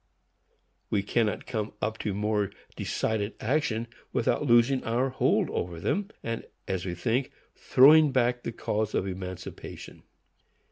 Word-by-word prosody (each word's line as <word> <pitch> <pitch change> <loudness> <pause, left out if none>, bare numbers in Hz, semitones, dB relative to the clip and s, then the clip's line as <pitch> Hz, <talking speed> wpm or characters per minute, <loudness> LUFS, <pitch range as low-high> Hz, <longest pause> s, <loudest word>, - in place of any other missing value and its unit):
We 100 - +1
cannot 105 -1 0
come 110 -4 -3
up 110 +1 -2
to 105 - -2
more 105 -1 0 0.3
decided 110 -1 -1
action 120 -3 0 0.3
without 125 +4 +1
losing 120 +2 +4
our 120 +4 +1
hold 130 - +2
over 85 -2 -3
them, 200 - 0 0.2
and, 115 0 -3 0.2
as 95 -1 -2
we 90 - -3
think, 120 +8 0 0.2
throwing 150 +3 +6
back 125 -1 +2
the 115 - -4
cause 110 -2 -2
of - - +1
emancipation. 95 -1 -7
115 Hz, 135 wpm, -28 LUFS, 100-125 Hz, 0.3 s, throwing